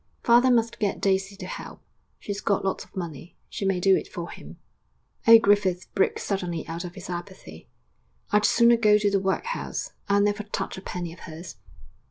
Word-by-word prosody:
'Father 240 +2 +5
must 235 -1 +1
get 205 -2 -1
Daisy 195 0 0
to 195 -2 -8
help; - - -8 0.4
she's 205 0 -5
got 200 -2 0
lots 190 - -1
of - - -22
money. 170 -3 -7
She 200 - -4
may 195 -2 +1
do 190 +1 +5
it - - -3
for 170 -1 -7
him.' - - -11 0.7
Old 230 0 +9
Griffith 195 -3 +2
broke 195 - +1
suddenly 180 -5 -3
out 165 +2 -5
of 175 -1 -8
his - - -9
apathy. 180 +2 -8 0.6
'I'd 210 0 +3
sooner 235 0 +5
go 210 -2 +5
to 205 -1 +1
the 195 - +2
workhouse; 195 - -3 0.2
I'll 200 0 +4
never 205 +1 +1
touch 200 -2 -4
a 190 - -8
penny 175 -3 -5
of 170 - -15
hers!' 160 +1 -9
195 Hz, 190 wpm, -25 LUFS, 180-210 Hz, 0.7 s, Old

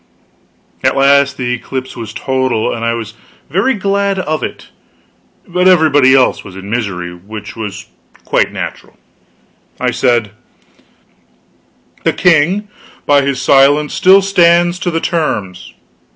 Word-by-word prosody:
At - - +2
last 140 0 +3
the 125 -1 -2
eclipse 130 +2 -6
was 110 -3 -7
total, 130 -2 -1
and 115 - -5
I 115 0 0
was 110 -2 -6 0.4
very 215 +9 +1
glad 200 0 -1
of 155 -4 -2
it, - - -7 0.8
but 180 0 +1
everybody 145 -7 +5
else 130 -1 +2
was 95 -2 -12
in 95 +2 -9
misery; 95 -7 -3
which 105 +4 -10
was 105 -4 -6 0.4
quite - - +1
natural. - - -7 0.8
I - - 0
said: 120 -5 0 1.7
"The - - +1
king, 180 +5 +2 0.4
by 145 -1 +4
his 140 -2 -2
silence, 140 +3 +3
still 190 +1 +5
stands 175 -2 +3
to 180 - -2
the 165 -1 -2
terms." 100 - -3
140 Hz, 130 wpm, -14 LUFS, 115-175 Hz, 1.7 s, everybody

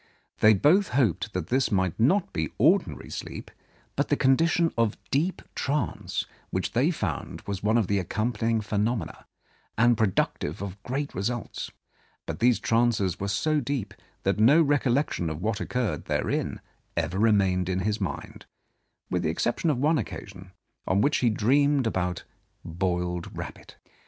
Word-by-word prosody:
They 110 0 +6
both 175 - +4
hoped 115 - +1
that 90 -2 -3
this 130 0 +1
might 95 -2 0
not 170 - +2
be 80 -2 -2
ordinary - - +2
sleep, - - -7 0.4
but - - +1
the - - +1
condition 165 +5 +3
of 115 -3 +1
deep 165 +7 0
trance 145 +2 -2 0.2
which 95 +1 -2
they 125 +7 +2
found 95 - -3
was 100 -1 -5
one 110 +3 +2
of 115 - +2
the 100 +2 +1
accompanying 110 +4 -1
phenomena, 110 +2 -2 0.5
and 120 +2 +5
productive 95 -7 0
of 100 0 -6
great 140 +3 -3
results; 115 +5 -3 0.6
but - - -5
these 120 0 +4
trances 115 -6 +1
were 100 - -2
so 150 +10 +1
deep, 120 -6 -3 0.3
that 100 +2 +1
no 130 +9 +6
recollection 140 - +1
of 80 0 -5
what 110 -1 -1
occurred 125 -3 -2
therein - - -1 0.4
ever 85 +3 -1
remained 95 -4 +3
in 95 0 0
his 105 +2 -1
mind, 95 - -5 0.6
with - - +1
the - - 0
exception 120 - 0
of 145 - +1
one 150 +4 +2
occasion, 95 -3 -7 0.4
on 95 +2 +2
which 145 +5 +3
he 120 - +3
dreamed 135 +5 +3
about 90 -5 -1 0.4
boiled 90 0 -2
rabbit. - - -8
110 Hz, 150 wpm, -27 LUFS, 95-130 Hz, 0.6 s, They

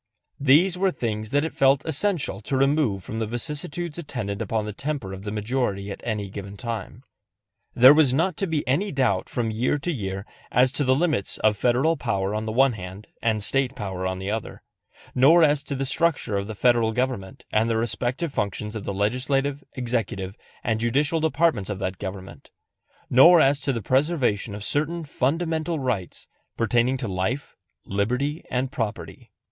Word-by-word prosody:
These 165 +7 +4
were 195 0 +3
things 110 -9 -3
that 145 +4 +1
it 160 - -3
was - - -23
felt 135 0 +4
essential 160 - 0
to 130 +5 -2
remove 135 - +2
from 110 - -5
the 110 - -1
vicissitudes 150 +7 -4
attendant 110 -10 -4
upon 110 -2 -1
the 105 - -5
temper 140 -7 -4
of 95 - -7
the 105 - -3
majority 105 -2 -2
at - - -7 0.3
given 100 0 -8
time. 115 +2 -6 0.7
There 130 +3 +9
was 150 -4 +4
not 165 +6 +1
to 195 - 0
be 155 -3 -2
any 180 +11 +1
doubt 130 -9 0
from 115 -3 -1
year 120 +6 0
to 160 +5 -2
year 100 - -4 0.3
as 125 +1 +4
to 145 +2 -1
the 130 -1 +3
limits 150 - 0
of 110 -1 +4
Federal 125 +9 +2
power 100 -6 -1
on 110 +1 -3
the - - -1
one 135 +2 +4
hand 95 +1 -9
and 110 -2 +1
State 135 +3 +1
power 95 -3 -3
on 95 0 -2
the 95 +2 -3
other; 110 0 -5 0.5
nor 160 +7 +6
as 145 -2 +4
to 140 - -5
the 135 +1 -2
structure 145 -6 +1
of 100 0 -2
the 110 - -6
Federal 115 0 +3
government 125 -6 -3
and 110 +2 +2
the 115 - +1
respective 125 +7 -2
functions 105 0 -2
of 105 - -5
the 100 - -3
legislative, 135 +7 0
executive, 115 -6 -2 0.3
and 110 -1 0
judicial 145 +8 +1
departments 155 - +1
of 105 - -3
that 95 -1 -4
government; 95 -1 -8 0.6
nor 165 +8 +8
as 140 -1 +4
to 140 -1 -1
the 115 -5 -3
preservation 130 - +1
of 105 - -7
certain 155 +7 -1
fundamental 160 +4 -1
rights 125 - -3 0.3
pertaining 120 +3 +2
to 125 - -4
life, 100 +9 -2 0.3
liberty 125 +10 -1
and 130 +1 -1
property. 115 -6 -5
125 Hz, 180 wpm, -24 LUFS, 105-145 Hz, 0.7 s, There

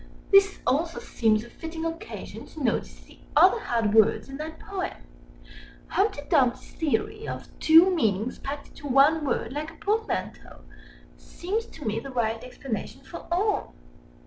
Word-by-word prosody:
This 395 0 +6
also 330 +5 0
seems 220 -2 +1
a 235 - -12
fitting 325 0 -6
occasion 330 0 -6
to 310 - -8
notice 240 - -1
the - - -19 0.2
other 365 +9 +6
hard 230 - 0
words 225 +4 +4
in 270 - -7
that 315 +1 -6
poem. 385 -2 -4 0.9
Humpty 395 -6 +1
Dumpty's 260 -7 +2
theory, 420 +7 -2
of - - -6
two 330 +4 +7
meanings 220 - 0
packed 285 +1 -6
into 290 - -10
one 285 +4 +5
word 245 -3 -1
like 300 +2 -4
a 325 - -14
portmanteau, 435 +6 -3 0.6
seems 415 +6 -4
to 295 - -11
me 220 +1 0
the 275 - -8
right 225 -3 -1
explanation 250 -2 -6
for - - -10
all. 400 +4 0
300 Hz, 150 wpm, -26 LUFS, 245-355 Hz, 0.9 s, two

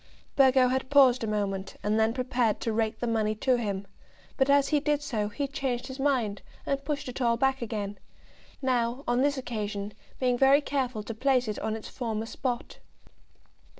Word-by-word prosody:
Burgo 260 -2 +5
had 260 0 -1
paused 265 -4 +5
a - - -1
moment, 200 -2 -2
and 210 +1 +1
then 220 0 +3
prepared 245 -3 0
to 225 - -2
rake 220 0 -1
the - - 0
money 220 -2 0
to 250 +3 +2
him; 200 -3 -3 0.5
but 265 0 +2
as 280 0 +4
he 300 - +3
did 295 0 0
so, 215 -7 -2
he 280 +7 -3
changed 270 -4 -2
his 260 0 -8
mind, 250 -8 0 0.2
and 275 0 -1
pushed 285 -1 -3
it 250 +1 -6
all 235 -1 +2
back 270 +1 +1
again, 205 -3 -4 0.6
now, 250 0 0
on 245 +1 +2
this 285 0 +2
occasion, 210 -5 -4 0.3
being 250 -2 +1
very 275 +1 +6
careful 255 -7 -2
to 230 - -5
place 255 +1 +1
it 210 - -3
on 220 - -2
its 220 - -7
former 225 -3 -3
spot. 245 +1 -4
245 Hz, 185 wpm, -28 LUFS, 220-270 Hz, 0.6 s, very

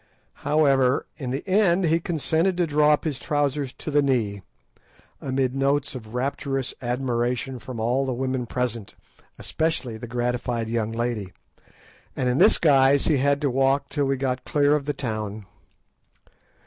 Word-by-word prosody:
However, 140 -3 +3
in 130 -4 -5
the 135 +8 -4
end 190 -2 +3
he 165 +1 +3
consented 165 +2 0
to 175 - +2
draw 150 -1 +3
up 150 - 0
his 145 -5 -3
trousers 145 -3 -1
to 155 - -7
the 145 0 +4
knee, 115 -8 0 0.8
amidst 130 -1 -1
notes 140 +1 0
of 115 -3 -9
rapturous 135 0 -2
admiration 125 0 -2
from 130 -2 -8
all 125 +5 0
the 130 - -1
women 130 -1 -2
present, 120 -4 -3 0.4
especially 155 -8 -2
the 120 +2 -8
gratified 120 -1 -2
young 115 -1 -1
lady, 115 -5 -3 0.8
and 130 - -1
in 125 +2 +1
this - - +6
guise 140 -2 +4
he 155 - +3
had 140 +2 +2
to 140 -3 +1
walk 135 +2 +1
till 145 -2 0
we 135 0 0
got 130 -1 -2
clear 145 0 +2
of 145 -2 -2
the 145 - -1
town. 110 -5 -4
135 Hz, 160 wpm, -24 LUFS, 120-145 Hz, 0.8 s, this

